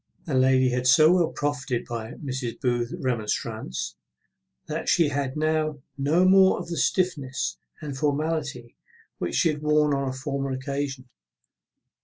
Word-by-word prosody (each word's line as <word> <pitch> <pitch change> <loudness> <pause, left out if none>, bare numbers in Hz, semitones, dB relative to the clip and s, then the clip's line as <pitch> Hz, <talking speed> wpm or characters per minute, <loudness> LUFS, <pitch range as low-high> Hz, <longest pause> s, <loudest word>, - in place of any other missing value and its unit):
The 155 - -4
lady 130 0 +4
had 125 0 0
so 155 +5 +7
well 180 -2 +4
profited 145 -4 -2
by 115 -1 -5
Mrs. 130 -5 -5
Booth's 120 +3 -1
remonstrance, 110 - -3 0.7
that - - -3
she 165 -4 +4
had 140 -1 -2
now 155 -2 0
no 150 +6 +2
more 190 0 +6
of 175 - -6
that 170 - -3
stiffness 145 -4 0 0.2
and 145 -3 -5
formality 145 -3 -2 0.4
which 85 - -2
she 165 - +3
had 150 -1 -3
worn 150 -1 +3
on 140 -1 -1
a - - -4
former 135 +1 -3
occasion. 135 0 -4
140 Hz, 145 wpm, -25 LUFS, 130-155 Hz, 0.7 s, so